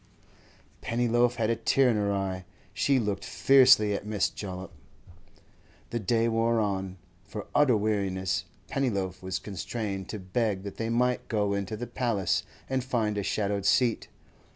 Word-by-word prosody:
Pennyloaf 120 +1 +1
had 115 -1 +1
a - - +2
tear 130 +4 +3
in - - 0
her 100 -1 +1
eye; 95 -2 -2 0.3
she 140 -1 +2
looked 105 -4 -1
fiercely 130 -6 +5
at 100 - -3
Miss 105 -1 0
Jollop. 95 -2 -7 1.2
The 120 - -1
day 115 +2 +1
wore 115 0 +2
on. 95 -3 -2 0.3
For 105 +2 -7
utter 140 -6 +4
weariness 95 -3 -1 0.2
Pennyloaf 100 -9 -1
was 95 -1 -3
constrained 100 -1 -5
to 110 - -4
beg 95 +1 -1
that 100 -1 -7
they 115 0 -2
might 125 +2 +1
go 105 -2 0
into 100 +2 -3
the 120 - -4
'Paliss' 115 -6 0 0.3
and 130 -1 -1
find 115 -5 0
a 100 - -1
shadowed 100 0 -1
seat. 115 +4 +2
105 Hz, 155 wpm, -28 LUFS, 100-120 Hz, 1.2 s, fiercely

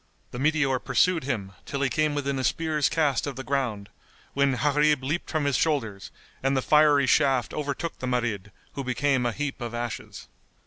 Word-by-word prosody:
The 125 - -6
meteor 140 -3 +2
pursued 175 0 +1
him, 105 -8 -3
till 140 - -4
he - - +3
came 150 +3 0
within 140 -1 -1
a - - -2
spear's 155 -1 +1
cast 145 -5 +1
of 140 - -4
the 135 - -6
ground, 120 -7 -2 0.5
when 140 -1 +2
Gharib 150 +2 +2
leaped 155 +6 -2
from 155 -3 -1
his 140 -2 +1
shoulders 115 -11 -1 0.3
and 135 0 +1
the 130 - 0
fiery 150 -2 +5
shaft 130 -2 +2
overtook 150 +3 -4
the 130 - -4
Marid, 115 -6 -1 0.2
who 140 - -4
became 130 0 +1
a - - 0
heap 140 +1 -4
of 120 -1 -4
ashes. 120 -1 -6
140 Hz, 185 wpm, -26 LUFS, 125-150 Hz, 0.5 s, fiery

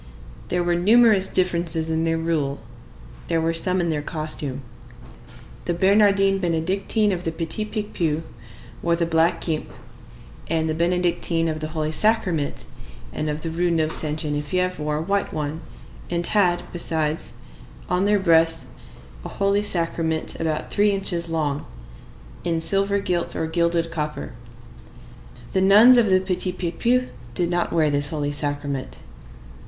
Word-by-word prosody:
There 180 0 0
were 175 0 +1
numerous 205 +2 +4
differences 170 -3 0
in 160 0 0
their 165 0 +1
rule; 155 -4 -1 0.7
there 165 -1 +1
were 165 +1 0
some 180 +3 +3
in 170 -2 0
their 150 -1 -1
costume. 150 -3 -4 1.0
The 175 - -1
Bernardines 195 +1 +3
Benedictines 190 +5 +1
of 180 -1 -4
the 165 - -1
Petit 165 +6 -1
Picpus 175 -8 -2 0.6
wore 170 0 +1
the 170 0 0
black 165 +1 +2
guimpe, 155 -2 -2 0.8
and 160 0 0
the 155 - 0
Benedictines 170 -1 +1
of 155 - -5
the 155 - -4
Holy 155 0 -1
Sacrament 180 -6 0 0.5
and 155 0 -2
of 150 +1 -3
the 165 - -4
Rue 175 +2 0
Neuve 160 -2 +1
Sainte 155 -1 -1
Geneviève 155 +5 -1
wore 150 0 -1
a - - -2
white 200 +3 -1
one, 155 +1 -4 0.5
and 170 0 -1
had, 180 -4 +2
besides, 160 -4 -1 0.5
on 180 +2 +1
their 205 0 +3
breasts, 165 -3 +3 0.5
a - - -6
Holy 200 +1 +1
Sacrament 165 -4 -1
about 160 -2 -2
three 205 +1 +3
inches 185 -4 -1
long, 150 -3 -1 0.8
in 165 -1 0
silver 195 +4 +1
gilt 180 -3 -1
or - - -1
gilded 170 0 0
copper. 150 -3 -4 1.2
The 190 - +2
nuns 215 +6 +7
of 225 - +3
the 185 0 +5
Petit 185 -1 0
Picpus 235 +9 0 0.3
did 175 -1 +1
not 175 0 0
wear 155 -3 +2
this 145 0 +1
Holy 145 -2 -2
Sacrament. 145 -2 -3
170 Hz, 150 wpm, -23 LUFS, 155-185 Hz, 1.2 s, nuns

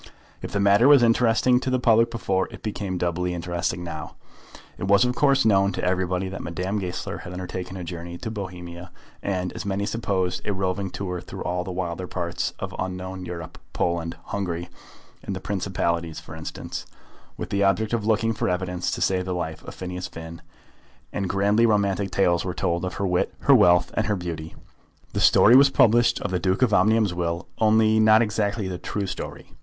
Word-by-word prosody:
If - - -6
the 100 - -1
matter 100 +5 +5
was 140 -4 +7
interesting 120 +1 +4
to 130 - -3
the 130 - +2
public 115 -2 +4
before, 95 -5 -1
it - - -12
became 100 -3 -3
doubly 90 0 -1
interesting 85 0 -2
now. 80 -3 -7 0.6
It - - -2
was 100 +3 +5
of 125 - +1
course 140 -1 +3
known 100 -2 +4
to - - -4
everybody 90 0 0
that 95 0 -6
Madame 90 +4 -3
Goesler 90 -2 -4
had 90 - -8
undertaken 90 +1 -5
a 90 - -5
journey 85 0 -6
to 110 - -5
Bohemia, 90 -3 -7 0.3
and, 90 -2 -2
as - - -5
many 100 0 -1
supposed, 100 -5 -1
a 105 - -1
roving 95 0 -2
tour 90 -2 -4
through - - -8
all 90 +1 -1
the 95 - -6
wilder 90 0 -3
parts 85 -1 -2
of - - -5
unknown 95 0 -4
Europe, 85 -2 -7
Poland, 85 -1 -1
Hungary, 85 -4 -4 0.5
and 100 - -4
the - - -4
Principalities 85 -5 -2
for 80 0 -11
instance, 80 0 -6 0.5
with - - -6
the 100 0 +2
object 100 +3 +1
of 115 -3 0
looking 110 +1 +2
for 105 - -1
evidence 90 0 -2
to - - -3
save 90 -1 +1
the 90 -1 -2
life 80 -2 -4
of - - -8
Phineas 90 0 -5
Finn; 80 +1 -9 0.7
and 95 -2 -2
grandly 100 +4 +3
romantic 100 -2 +1
tales 90 -2 +2
were 90 -1 -4
told 85 -1 -1
of 90 - -4
her 100 - -2
wit, 90 -1 0
her - - +5
wealth, 90 0 +5
and 110 - 0
her 105 - +1
beauty. 85 -3 -6 0.6
The - - -1
story 115 - +7
was 140 +1 +8
published 120 -2 +4
of 100 - -3
the 90 - 0
Duke 95 +6 +1
of 115 -4 +2
Omnium's 105 0 +3
will, 85 0 -2
only 110 0 +4
not 110 +1 +6
exactly 105 -1 -1
the 90 -1 -5
true 100 -1 -3
story. 95 - -7
95 Hz, 195 wpm, -24 LUFS, 90-105 Hz, 0.7 s, was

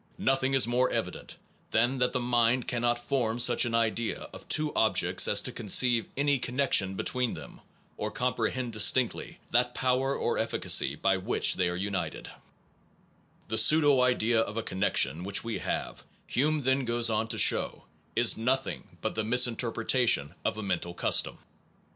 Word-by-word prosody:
Nothing 135 0 0
is 135 - +5
more 125 +2 +1
evident - - -5 0.3
than 120 +4 +1
that 125 0 +1
the 125 - -2
mind 120 0 +1
cannot 120 -1 0
form 120 -2 -2
such 120 0 +3
an 115 -1 -2
idea 115 0 -1
of - - -13
two 155 -1 +1
objects - - +2
as - - +2
to - - -3
conceive 120 +3 +2
any 140 -1 +1
connection 125 -7 0
between 125 +4 -1
them, - - -12 0.4
or - - -3
comprehend 125 0 -2
dis 105 -1 +5
tinctly 130 -3 -3 0.2
that 125 +1 +1
power 130 +2 0
or - - -2
efficacy 70 - +1
by 95 +5 0
which 95 - 0
they 90 -1 -1
are 90 - -4
united/ 95 +1 -4 1.2
The 110 0 +2
pseudo 145 +2 +5
idea 120 -2 +2
of 110 0 -4
a 115 - -1
connection 95 -4 0
which 100 +1 -1
we 115 -1 -4
have, - - -4 0.2
Hume 150 +4 0
then 130 +1 +1
goes 120 -1 0
on 110 +1 -1
to - - -3
show, - - +2 0.3
is 120 -1 +4
nothing 130 +4 -3
but - - -3
the 110 - -2
misinterpretation 115 - +1
of - - -2
a 110 - -5
mental 90 -3 -3
custom. - - +1
120 Hz, 165 wpm, -28 LUFS, 110-130 Hz, 1.2 s, is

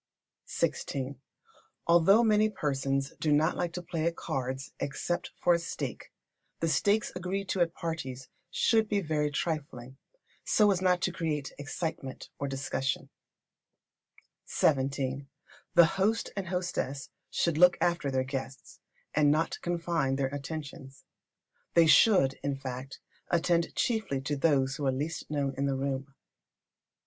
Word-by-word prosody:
xvi. 135 0 -2 0.7
Although 175 +7 +6
many 215 -1 +4
persons 135 -6 -1
do 155 - +1
not 155 +3 +3
like 175 -1 -1
to 180 - -5
play 165 -2 -2
at 170 - -1
cards 130 0 -4
except 160 +5 -2
for 175 - +4
a 170 - +2
stake, 170 - -5 0.5
the 165 - 0
stakes 205 +6 +2
agreed 185 +2 -3
to 185 - 0
at 170 -1 +1
parties 135 -6 -5 0.2
should 220 +3 +2
be 205 - +2
very 150 -4 0
trifling, 140 -4 -4 0.5
so 210 -2 +4
as 185 -2 0
not 180 -1 +3
to 185 - +1
create 155 -5 -3
excitement 145 -1 -5
or 140 - -2
discussion. 135 -1 -2 1.4
xvii. 135 -1 0 0.5
The 170 -1 +9
host 195 +6 0
and 195 -3 -3
hostess 175 -7 -3 0.2
should 165 -3 0
look 180 0 +7
after 170 -5 +1
their 130 -1 +1
guests, 135 0 -6 0.3
and 150 -1 +4
not 155 +3 +1
confine 170 -5 0
their 135 0 -1
attentions. 140 -2 -7 0.7
They 170 -1 +7
should, 160 -6 +5
in 140 -1 -1
fact, 135 0 -7 0.3
attend 170 0 +1
chiefly 220 - 0
to 145 +2 -2
those 135 -3 +2
who 145 - -1
are - - +3
the 130 - -3
least 155 +4 -4
known 140 -2 -1
in 140 - +1
the 135 - 0
room. 135 0 -3
150 Hz, 140 wpm, -30 LUFS, 135-175 Hz, 1.4 s, The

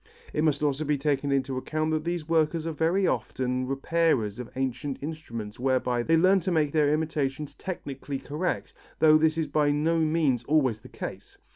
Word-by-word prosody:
It 150 - 0
must 150 -2 +1
also 145 0 +1
be 150 -1 +1
taken 140 0 0
into 135 -1 0
account 155 +3 -2
that 155 -1 0
these 170 -2 -2
workers 165 0 +1
are 165 - -1
very 165 +5 +1
often 125 +1 -1
repairers 135 -6 +1
of 125 - -6
ancient 135 +1 -2
instruments 115 -9 -6
whereby 125 -1 +1
they 165 +7 +3
learn 185 +4 +5
to 185 +1 -2
make 155 -4 +2
their 150 -2 +3
imitations 150 -2 -1
technically 140 -6 -5
correct, 155 +7 -3 0.2
though 155 -1 +6
this 155 0 +2
is 160 - +1
by 150 0 +1
no 155 +3 +1
means 155 -6 +1
always 130 -7 +2
the - - -13
case. - - -8
150 Hz, 180 wpm, -27 LUFS, 135-160 Hz, 0.2 s, though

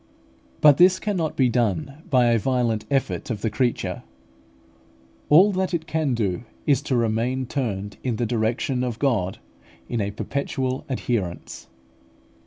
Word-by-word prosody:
But 145 -2 +7
this 185 +1 +6
cannot 180 -7 -2
be 130 - +3
done 120 - -1
by 125 -3 +4
a 115 - +3
violent 120 -3 0
effort 135 -1 -1
of 110 -4 -3
the 110 - -1
creature; 120 +3 -1 1.3
all 185 +8 +7
that 190 -1 -1
it 160 -1 -3
can 155 -6 0
do 100 -6 -1 0.2
is 140 -3 +3
to 130 - +2
remain 120 +3 0
turned 105 -7 -3
in 125 -3 -1
the 120 - -1
direction 120 +3 -1
of 120 -3 -3
God 115 -9 0 0.5
in 120 -3 -2
a 100 - -1
perpetual 130 +3 -3
adherence. 115 -9 -3
125 Hz, 145 wpm, -24 LUFS, 110-140 Hz, 1.3 s, But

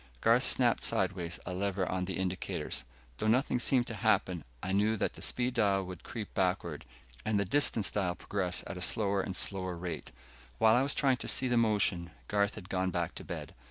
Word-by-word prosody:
Garth - - +4
snapped - - +3
sideways 85 -2 0
a 90 - -4
lever 95 0 -1
on 90 0 -1
the 95 -2 -3
indicators. 95 -1 -3 0.3
Though - - 0
nothing 125 +2 +2
seemed 125 0 +2
to 115 - -6
happen, 95 -6 +1 0.2
I 95 - -2
knew 105 +3 +2
that - - -1
the - - -12
speed 125 0 0
dial 100 -4 +2
would 90 -1 -9
creep 110 -4 -7
backward, 90 -5 -1 0.4
and 110 -1 +1
the 100 - +1
distance 110 -2 +4
dial 95 -4 0
progress 90 -2 -1
at 95 - -6
a - - -7
slower 100 0 +1
and 95 0 -5
slower 95 -3 -1
rate. 85 -6 -5 0.5
While 110 - +5
I 125 - +4
was 140 +1 +1
trying 135 -3 +3
to - - -6
see 130 - +3
the 125 - +1
motion, 105 -6 +2 0.2
Garth 100 0 +1
had 95 -4 -9
gone 95 -1 0
back 85 -2 -2
to - - -8
bed. - - -7
100 Hz, 205 wpm, -31 LUFS, 90-110 Hz, 0.5 s, While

